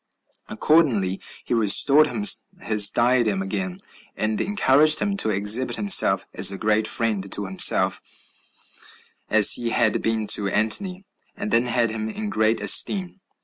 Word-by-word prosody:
Accordingly, 115 - -1 0.2
he - - -6
restored 135 +7 +3
him 115 -7 -6 0.4
his 105 -2 +3
diadem 120 -5 -1
again; 95 -2 -6 0.4
and 110 0 -3
encouraged 155 -6 +1
him 200 -1 -3
to 110 - 0
exhibit 105 +5 +1
himself 100 - +2
as 95 +1 +3
great 110 +2 -2
a - - -7
friend 105 -4 -2
to 100 - -1
himself 95 0 +1 1.3
as 110 -2 +5
he 120 -1 -2
had 115 -1 -1
been 110 -1 -3
to 100 - 0
Antony, 180 - -2 0.3
and 200 +1 -7
then 120 +2 0
had 120 -2 -1
him 110 0 -6
in 210 - -7
great 110 +1 -1
esteem. 190 -1 +1
110 Hz, 145 wpm, -20 LUFS, 105-140 Hz, 1.3 s, as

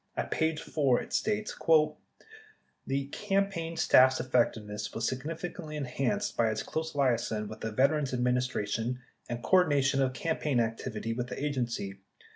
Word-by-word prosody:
At - - -2
page 160 -1 +1
4 135 -5 +2
it - - -8
states: 215 0 0 1.3
The 135 0 0
campaign 195 -4 -1
staff's 130 0 +5
effectiveness 115 -4 0
was 115 0 0
significantly 155 +3 -5
en 145 - -2
hanced 205 +12 -1
by 115 -1 +2
its 110 - -2
close 160 -1 -4
liaison 120 -6 +1
with 110 +1 -9
the 110 - -3
Veterans' 140 +4 +2
Administration 125 -2 0 0.3
and 120 0 -4
cordination 145 -7 +3
of 130 -1 +1
campaign 150 -1 0
activity 115 0 -2
with 120 +1 -3
the - - -6
agency. 120 -9 -2
130 Hz, 140 wpm, -30 LUFS, 120-155 Hz, 1.3 s, staff's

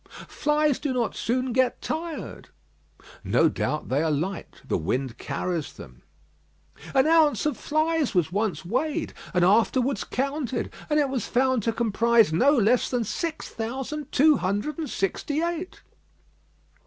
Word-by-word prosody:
"Flies 300 -2 +1
do 285 -3 -2
not 240 -3 -1
soon 255 +1 -1
get 255 0 +2
tired." 320 0 -5 0.7
"No - - +3
doubt; 150 - -3
they 135 +3 +1
are 160 - +1
light; 165 +7 -3
the - - 0
wind 125 - -2
carries 175 -4 -3
them." - - -13 0.9
"An 265 0 +5
ounce 315 -3 +4
of 300 - +1
flies 310 -4 0
was 170 -2 +2
once 205 -1 -1
weighed, 260 - -1 0.2
and 180 -3 +3
afterwards 240 +6 +2
counted; 270 -2 -3 0.2
and 300 0 +3
it 285 -2 +2
was 260 -5 -2
found 260 -1 +2
to 230 - 0
comprise 230 -3 +3
no 250 - +4
less 245 -3 +3
than 245 -2 0
six 320 - -4
thousand 265 +6 -5
two 300 +2 +5
hundred 205 - -2
and 315 - -3
sixty 290 - -1
eight." 345 +2 -4
255 Hz, 145 wpm, -25 LUFS, 205-300 Hz, 0.9 s, An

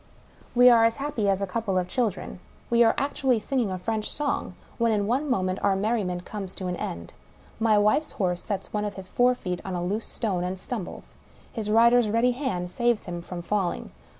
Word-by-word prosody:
We 245 +1 +7
are 230 -1 +6
as 230 0 +3
happy 275 -8 -1
as 195 0 +1
a - - +2
couple 195 0 -1
of 180 -1 0
children; 205 -4 -2 0.3
we 235 0 +6
are 225 - +4
actually 270 -3 +1
singing 235 0 -1
a 185 - -3
French 215 +3 -2
song 290 -1 -2
— - - -26
when 230 -1 +3
in 205 -2 +1
one 265 +7 0
moment 185 -6 0
our 200 -1 +3
merriment 195 -4 -1
comes 195 -3 -6
to 190 - -5
an 180 0 -2
end. 85 0 -5 0.5
My 220 -2 +4
wife's 210 +9 +2
horse 180 -3 -1
'sets 200 -3 -4
one 210 0 0
of 205 -1 -3
his 190 -1 -8
forefeet 245 -7 +1
on 190 -2 -4
a 175 - -2
loose 205 +5 -2
stone, 190 -6 -2
and 180 +1 -3
stumbles. 215 -1 -6 0.4
His 215 -3 -4
rider's 235 +1 +5
ready 230 +3 +3
hand 240 -10 -3
saves 240 -1 +1
him 175 -1 -5
from 175 0 -7
falling. 190 -1 -1
210 Hz, 205 wpm, -26 LUFS, 185-235 Hz, 0.5 s, We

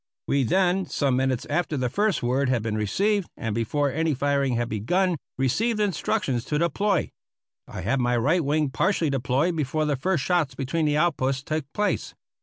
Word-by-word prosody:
We 140 - +2
then, 185 +6 +2
some 140 -4 0
minutes 130 -1 0
after 155 0 -1
the 130 -1 0
first 200 - 0
word 130 +2 +1
had 120 -4 +1
been 110 -1 -2
received, 195 - 0
and 110 -2 -3
before 135 +6 0
any 160 +1 0
firing 140 -1 +1
had 120 0 0
begun, 175 - 0 0.2
received 215 - +1
instructions 150 - 0
to 150 - -1
deploy. 175 +3 0 0.6
I - - -7
had 120 +10 0
my 120 -1 +1
right 155 +9 +2
wing 150 0 +1
partially 170 -2 +1
deployed 135 +6 0
before 155 0 -1
the 150 -1 +1
first 160 +2 0
shots 165 -6 +1
between 145 +4 -1
the 150 0 +1
outposts 135 -5 +1
took 155 -2 -3
place. 210 +5 -1
145 Hz, 180 wpm, -25 LUFS, 130-175 Hz, 0.6 s, We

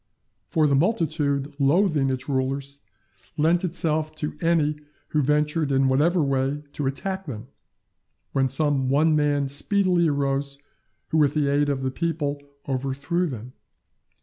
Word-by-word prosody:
For 155 -2 +2
the 145 - +3
multitude 150 -4 0
loathing 150 -1 +3
its 130 -1 -3
rulers, 135 +1 -2 0.6
lent 165 +4 +3
itself 155 -3 -1
to 150 -1 -4
any 160 -3 +2 0.3
who 150 - +1
ventured, 150 +1 +1
in 135 0 +3
whatever 155 +6 +3
way, 135 +1 0
to 145 - -2
attack 190 +7 -3
them; 120 -2 -7 0.8
when 135 -1 +1
some 135 -1 +1
one 155 +3 +3
man 145 -2 +1
speedily 180 +4 +1
arose 140 -1 0 0.5
who 160 - +2
with 145 0 +3
the 150 -2 +2
aid 145 +1 +2
of 135 -2 -1
the 130 - -1
people 145 -2 -2 0.3
overthrew 140 +7 -1
them. 125 -3 -7
145 Hz, 140 wpm, -24 LUFS, 135-160 Hz, 0.8 s, the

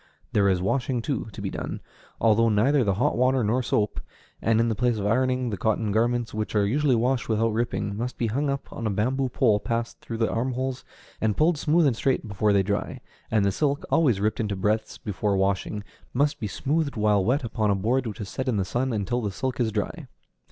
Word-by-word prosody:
There 100 -2 +4
is 90 -1 +1
washing, 120 +3 0
too, 130 -5 -2
to - - -8
be - - -2
done, - - -5 0.4
although 115 +1 +4
neither 125 +7 +3
with 100 -3 +1
hot - - +2
water 130 +1 +2
nor 115 +5 +1
soap; 105 -4 0 0.4
and 115 0 +2
in 115 - +3
the 115 - +1
place 120 +1 +1
of 100 - -3
ironing, 125 +2 +1
the 100 - -3
cotton 110 +1 0
garments, 120 +1 +1
which 110 0 -3
are 105 -1 +3
usually 135 +4 +2
washed 125 +1 0
without 110 0 +1
ripping, 105 -3 -1
must 120 +4 -4
be 120 - 0
hung 140 +6 0
up 140 0 -4
on 115 - -3
a - - +1
bamboo 125 +7 0
pole 115 -4 +3
passed 115 +2 -3
through 115 - -5
the 115 -1 +1
armholes, 130 +2 -2 0.4
and 110 -2 +1
pulled 160 0 +3
smooth 160 +3 +3
and 135 -5 +3
straight 130 0 0
before 105 +1 +1
they 100 -1 +4
dry; 100 +1 -2 0.3
and 110 -2 +2
the 100 - +3
silk, 145 +7 0
always 130 -11 +3
ripped 110 +4 0
into 105 -3 -1
breadths 110 +3 -1
before 100 0 -1
washing, 100 +2 -1 0.3
must 145 +3 +1
be 110 - -2
smoothed 145 - -1
while 105 -2 +2
wet 130 +7 +1
upon 110 -2 -1
a 100 - +3
board 120 +6 0
which 105 - -6
is 100 - -4
set 130 +6 -4
in 120 -4 +1
the 95 - 0
sun 125 +7 -1
until 110 +3 -1
the 105 - -1
silk 130 +7 -3
is 115 -2 +1
dry. 105 -1 -3
115 Hz, 225 wpm, -25 LUFS, 105-130 Hz, 0.4 s, There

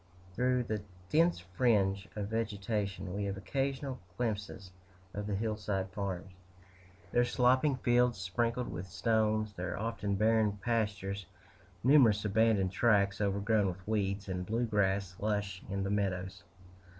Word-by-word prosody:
Through 125 +4 +1
the 110 -3 -3 0.3
dense 165 +3 +4
fringe 95 0 +1
of 105 -1 -3
vegetation, 105 -3 -2
we 100 0 -2
have 100 -1 -3
occasional 135 +3 -2 0.2
glimpses 105 -5 -3 0.4
of 105 0 -4
the 105 - -1
hillside 105 -3 -2
farms 95 -1 -4 0.8
their 120 - +4
sloping 130 +4 +3
fields 120 -1 +2
sprinkled 115 +7 -1
with 90 +2 -5
stones, 110 +1 +1
their 90 -2 -4
often 105 -2 -2
barren 110 0 +3
pastures, 100 -3 -2 0.6
numerous 120 -6 +5
abandoned 105 -2 +3
tracts 100 -2 +2
overgrown 100 +1 +2
with 95 +1 -6
weeds, 100 -2 -1
and 90 -1 -3
blue 115 +3 0
grass 100 -3 0
lush 105 -3 -1
in 100 0 -2
the 100 - -2
meadows. 95 -2 -1
105 Hz, 130 wpm, -32 LUFS, 95-115 Hz, 0.8 s, numerous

